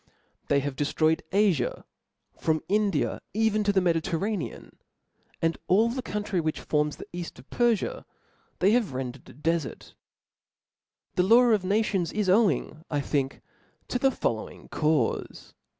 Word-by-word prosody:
They 140 0 +3
have 140 -1 -3
deftroyed 155 +3 +1
Afia, 195 - +2 0.5
from 160 -1 0
India, 200 -5 +1
even 220 -1 +2
to 205 - +3
the 195 -1 +3
Medi 170 -2 +2
terranean; 190 +3 -3 0.7
and 165 0 +1
all 220 +5 +4
the 255 +2 -3
country 205 -5 -2
which 155 -1 -2
forms 150 -1 0
the - - -8
eaft 175 -1 -6
of - - -15
Perfia, 240 -4 +1 0.5
they 195 +3 +4
have 220 - +1
rendered 130 0 -5
a - - -12
defart. 160 +1 -2 1.2
This 180 - +2
law 235 +4 +7
of 210 -4 +3
nations 195 -2 +1
is 210 -3 0
owing, 190 -6 +2
I 145 - 0
think, 140 -1 -2 0.5
to 250 - -1
the 270 - +4
following 115 - -3
caufe. 150 -6 -1
180 Hz, 145 wpm, -27 LUFS, 150-210 Hz, 1.2 s, law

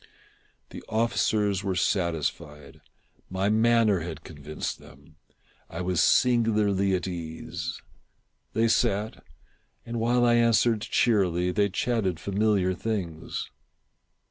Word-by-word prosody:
The - - -9
officers 105 -3 +1
were 95 -1 -1
satisfied. 80 -6 -2 0.5
My 95 +2 0
manner 110 -2 +3
had 80 -1 -7
convinced 75 -2 -6
them. 75 +4 -18 0.5
I 85 - -5
was 90 -2 0
singularly 105 -5 +3
at 90 - -3
ease. 80 -3 -6 0.7
They 115 +1 +2
sat, 105 -4 0 0.6
and 115 0 -4
while 120 +2 +2
I 120 - +4
answered 115 -1 +3
cheerily, 90 -7 +1
they 100 +2 +1
chatted 95 -4 -1
familiar 100 -1 +1
things. 90 -6 -4
100 Hz, 105 wpm, -26 LUFS, 90-110 Hz, 0.7 s, I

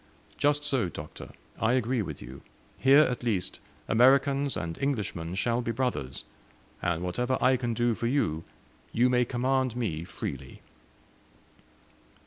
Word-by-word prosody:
Just 145 0 +2
so, 130 - +1
Doctor; 75 -2 -9 0.3
I 115 +2 +2
agree 125 -1 +1
with 80 - -6
you. 65 +3 -10 0.4
Here 135 +3 +7
at 125 -4 -1
least, 110 -7 -1 0.3
Americans 135 +3 +4
and 85 -1 -4
Englishmen 100 -11 -2
shall 115 +4 +1
be 115 - -2
brothers, 115 - -2 0.6
and, 85 0 -1
whatever 125 +8 0
I 130 0 +4
can 120 -2 -2
do 120 0 +2
for 115 - -2
you, 85 - 0 0.5
you 125 +2 +3
may 125 0 +3
command 130 0 0
me 95 -10 -2
freely." 70 -5 -7
120 Hz, 135 wpm, -28 LUFS, 90-130 Hz, 0.6 s, Here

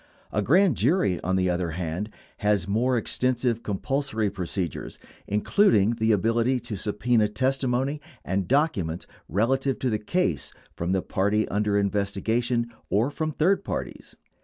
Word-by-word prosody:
A 105 - 0
grand 170 - +4
jury, 120 - +2
on 95 +2 0
the 95 -1 +2
other 90 -1 -1
hand, 90 +4 -3 0.3
has 105 -3 +1
more 120 +5 +1
extensive 120 0 0
compulsory 110 0 -1
procedures, 90 -3 -4 0.3
including 105 - +3
the 110 0 +3
ability 115 +5 +2
to 120 -1 -6
subpena 105 +2 +1
testimony 130 +4 0 0.2
and 95 0 -1
documents 105 - 0 0.2
relevant 130 +6 +1
to 130 - 0
the 110 - 0
case 180 +13 -1 0.2
from 85 +2 -2
the 95 - 0
party 105 +3 +1
under 105 0 +1
investigation 110 +4 0 0.2
or 115 +8 +2
from 155 +1 -2
third 185 +6 +2
parties. - - -5
110 Hz, 135 wpm, -26 LUFS, 100-130 Hz, 0.3 s, grand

